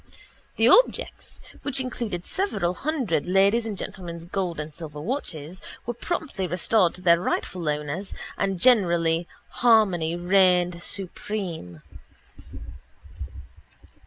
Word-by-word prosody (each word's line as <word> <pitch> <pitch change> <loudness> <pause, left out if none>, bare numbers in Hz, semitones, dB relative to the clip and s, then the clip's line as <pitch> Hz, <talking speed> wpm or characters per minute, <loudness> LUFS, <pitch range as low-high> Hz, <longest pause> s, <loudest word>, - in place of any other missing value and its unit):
The - - +4
objects - - +3 0.2
(which 275 -1 +2
included 235 -8 -4
several 370 - -1
hundred 250 - -1
ladies' 200 +5 +3
and 210 -3 -4
gentlemen's 170 -3 -6
gold 180 -2 -3
and 150 0 -6
silver 150 -2 -7
watches) 180 - -4 0.2
were 240 - -2
promptly 255 - -3
restored 180 +1 +2
to 180 - -11
their 170 -1 +4
rightful 175 -3 -2
owners 150 +6 -3 0.2
and 195 -2 -1
general 170 -7 +3 0.3
harmony 195 -9 +3
reigned 180 -1 +3
supreme. 175 - -5
180 Hz, 105 wpm, -25 LUFS, 170-215 Hz, 0.3 s, The